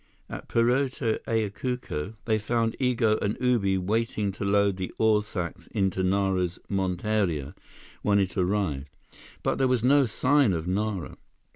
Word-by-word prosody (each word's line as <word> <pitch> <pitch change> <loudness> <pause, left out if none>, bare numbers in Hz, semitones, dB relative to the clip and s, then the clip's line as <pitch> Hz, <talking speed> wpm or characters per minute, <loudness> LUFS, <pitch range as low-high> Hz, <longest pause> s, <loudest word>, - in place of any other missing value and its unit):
At - - -7
Puerto 125 0 +1
Ayacucho, 110 - -2
they 110 -1 +2
found 115 +1 0
Igo 120 -4 +2
and 105 +1 -1
Ubi 110 -7 +2
waiting 105 +1 -1
to 100 - -6
load 100 -1 +2
the 95 -2 -4
ore 110 -1 +4
sacks 90 -5 -5
into 95 -1 0
Nara's 95 -2 +1
monteria, 95 -5 -1 0.5
when 100 -1 +2
it 95 -3 0
arrived. 90 -7 -1 0.5
But - - 0
there 135 - +3
was 125 -3 +1
no 140 +1 +5
sign 130 0 +3
of 80 -1 -3
Nara. 100 -1 -2
105 Hz, 140 wpm, -27 LUFS, 95-115 Hz, 0.5 s, no